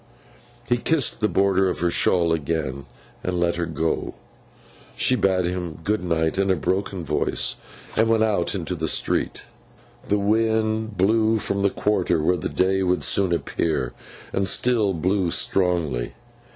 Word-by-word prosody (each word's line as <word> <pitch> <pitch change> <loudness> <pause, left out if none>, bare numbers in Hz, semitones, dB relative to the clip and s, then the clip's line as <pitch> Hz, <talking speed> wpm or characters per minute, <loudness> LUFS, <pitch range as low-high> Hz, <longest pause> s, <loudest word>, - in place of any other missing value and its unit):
He 120 - +2
kissed 145 +2 +1
the 105 - +2
border 95 -1 +2
of 90 - -4
her 85 -1 +1
shawl 85 -1 +2
again, 75 -4 -3 0.4
and 90 -1 -2
let 85 0 +1
her 85 -1 -2
go. 80 0 -2 0.8
She 130 - +2
bade 95 -5 +1
him 90 -2 -4
good 105 0 0
night 80 0 0
in 100 0 +1
a 95 - +4
broken 95 +2 -2
voice, 75 +1 0 0.4
and 110 +1 +2
went 110 -1 +3
out 100 -4 0
into 90 -1 -3
the 80 -2 -3
street. - - 0 0.6
The 105 - +2
wind 110 +1 0
blew 110 +4 +3
from 100 -2 -1
the 100 - +3
quarter 95 -5 0
where 90 +4 +1
the 80 - -4
day 95 +1 +1
would 90 -1 0
soon 95 -3 +2
appear, 80 -6 -1 0.4
and 95 0 +1
still 110 -6 +2
blew 95 +2 0
strongly. 85 -10 0
95 Hz, 155 wpm, -23 LUFS, 85-105 Hz, 0.8 s, a